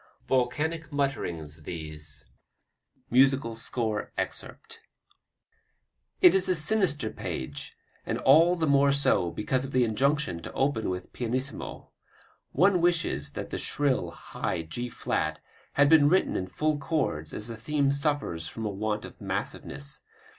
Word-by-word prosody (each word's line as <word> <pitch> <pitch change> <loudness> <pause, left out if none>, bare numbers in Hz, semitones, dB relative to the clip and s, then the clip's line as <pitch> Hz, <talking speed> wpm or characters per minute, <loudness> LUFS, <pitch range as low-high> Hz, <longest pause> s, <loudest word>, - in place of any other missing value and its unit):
Volcanic 150 +5 0
mutterings 85 - -2
these: 75 -2 -7 0.9
[Musical 130 -2 +4
score 110 -2 -2
excerpt] 455 0 -5 1.4
It 360 - +8
is 190 -1 +2
a 185 - +4
sinister 155 - +2
page, 65 - -5 0.3
and - - -2
all 165 +6 +6
the 165 -2 0
more 140 -1 +4
so 100 -10 +2
because 125 +8 -1
of 135 - -6
the 130 -1 +4
injunction 125 - +1
to - - -7
open 135 -6 0
with 90 0 -5
pianissimo. 130 +3 -3 0.6
One 185 -1 +4
wishes 160 - +1
that - - -6
the - - -3
shrill, 140 -3 0
high 80 - -4
G 120 +10 -5
flat 80 -8 -2 0.3
had 145 0 +5
been 145 -1 +6
written 185 +3 +2
in 95 - -2
full 150 +10 0
chords 135 - -1
as 105 - -1
the 115 - -5
theme 140 +4 +1
suffers 140 - -1
from 115 - -6
a 105 - -1
want 105 +2 -2
of - - -13
massiveness. 70 +1 -3
130 Hz, 140 wpm, -28 LUFS, 95-150 Hz, 1.4 s, It